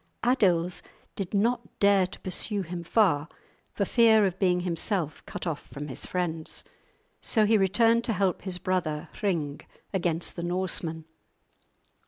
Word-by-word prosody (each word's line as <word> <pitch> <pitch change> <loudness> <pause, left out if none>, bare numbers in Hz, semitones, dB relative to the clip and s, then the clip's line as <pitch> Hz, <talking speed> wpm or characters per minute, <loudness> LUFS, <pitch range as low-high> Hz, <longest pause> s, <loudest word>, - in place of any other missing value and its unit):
Adils 185 -8 +2 0.3
did 195 -3 -4
not 225 +2 0
dare 200 -2 +4
to - - -10
pursue 195 +2 +1
him 170 0 -6
far, 165 -6 +2 0.4
for 200 - -1
fear 220 -1 +5
of 190 -1 -2
being 180 -2 +2
himself 175 -2 -2
cut - - -6
off 160 -4 -4
from 145 +1 -7
his 130 - -5
friends. 165 -3 -1 0.6
So 220 -3 +3
he 220 +2 +4
returned 225 +4 +3
to 225 - 0
help 190 -2 0
his 185 -2 -3
brother 170 -5 -2
Hring 160 -8 -1 0.3
against 170 -3 -1
the 170 - -5
Norsemen. 175 -2 -2
185 Hz, 145 wpm, -27 LUFS, 170-205 Hz, 0.6 s, fear